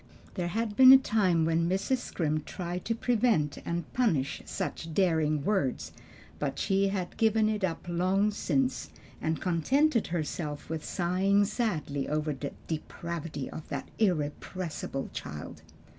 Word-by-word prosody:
There 180 -3 -2
had 215 +3 -2
been 260 +2 +10
a 265 - +11
time 190 -10 +2
when 165 +1 +1
Mrs. 195 +8 +1
Scrimp 155 -8 -2
tried 180 -1 -5
to 230 - 0
prevent 225 - +1
and 170 0 -3
punish 160 - +1
such 160 -1 -4
daring 155 -6 +2
words, 190 -12 0 0.5
but 140 -2 -2
she 195 0 +2
had 190 -3 -3
given 220 -1 +3
it 215 -2 -1
up 170 -3 -2
long 185 +4 +2
since, 260 +5 0 0.3
and 160 0 -1
contented 235 - +2
herself 155 -3 -3
with 160 -1 -3
sighing 190 +4 +2
sadly 160 - -2
over 150 0 0
the 140 +1 -5
"depravity 160 -2 -5
of 155 - -8
that - - -4
irrepressible 165 -5 -2
child." 75 0 -7
175 Hz, 140 wpm, -29 LUFS, 155-210 Hz, 0.5 s, a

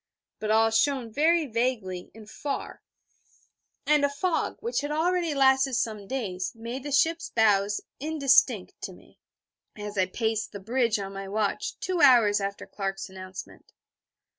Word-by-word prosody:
But 215 - -3
all 225 +1 +4
shone 240 0 +1
very 325 +3 +3
vaguely 225 -7 -2
and 220 -1 -12
far, 280 +5 -5 1.0
and 300 -1 +3
a 285 - +4
fog, 335 +5 -1
which 470 -6 -1
had 290 - -4
already 335 +1 0
lasted 265 -1 +4
some 215 -4 -2
days, 190 -8 -3
made 235 +4 -6
the 290 +2 -6
ship's 325 +4 +2
bows 205 -2 +2 0.2
indistinct 290 -2 +3
to - - -5
me, - - -20 0.6
as 210 -1 -5
I 185 - +3
paced 220 +2 -2
the 200 - -6
bridge 230 +2 +1
on 195 -1 -6
my 195 0 -6
watch, 205 0 -2
two 365 -2 -1
hours 230 -7 +6
after 200 0 -4
Clark's 195 -1 -4
announcement. 185 0 -10
230 Hz, 150 wpm, -27 LUFS, 205-285 Hz, 1.0 s, hours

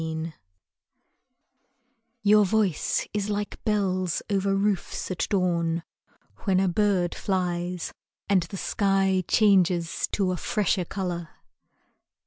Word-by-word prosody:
PRIME 160 0 -4 1.9
Your 210 0 +6
voice 200 -4 +1
is 210 0 -1
like 205 0 -3
bells 185 -5 0
over 195 0 +1
roofs 195 -2 -1
at 185 - -1
dawn 170 -4 +1 0.6
When 190 -3 +1
a 190 - +2
bird 185 -2 +1
flies 180 -2 -2 0.3
And 195 -3 +4
the 170 +4 -6
sky 195 -2 +1
changes 180 -5 +3
to 190 -3 +1
a 180 - -2
fresher 195 -1 0
color. 175 -3 -4
190 Hz, 110 wpm, -26 LUFS, 175-200 Hz, 1.9 s, Your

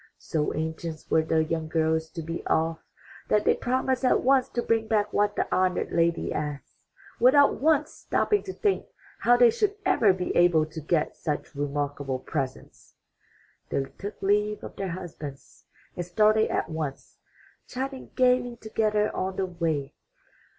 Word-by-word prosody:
So 150 -2 -2
anxious 160 0 -4
were 160 - +5
the 160 0 +1
young 160 0 -2
girls 160 0 0
to 165 - -5
be 165 +2 -5
off, 160 0 +1 0.5
that 210 0 +2
they - - +5
promised 260 +1 -1
at 255 - +3
once 265 0 +3
to 240 - -2
bring 225 -1 +1
back 210 -2 +1
what 205 0 +2
the - - 0
honored 185 -1 +1
lady 170 0 +1
asked, 150 -3 -5 0.4
without 275 +4 +5
once 305 0 +3
stopping 420 -1 0
to 380 - -4
think 405 0 0 0.3
how 245 +1 +4
they 240 -1 +6
should 410 - 0
ever 300 - +4
be 185 -1 -3
able 175 -3 +4
to 155 +1 -8
get 155 +1 0
such 150 +1 -4
remarkable 145 -1 -2
presents. 130 0 -6 0.7
They 135 - 0 0.2
took 205 +1 -6
leave 210 +1 +1
of - - -8
their 195 -1 -3
husbands 160 -5 -8 0.3
and 175 - -3
started 215 +5 +3
at - - -1
once, 155 -4 -6 0.5
chatting 265 +1 -5
gaily 250 -1 +3
together 215 -1 0
on 190 0 -2
the 190 - 0
way. 165 -6 -2
180 Hz, 155 wpm, -26 LUFS, 160-235 Hz, 0.7 s, they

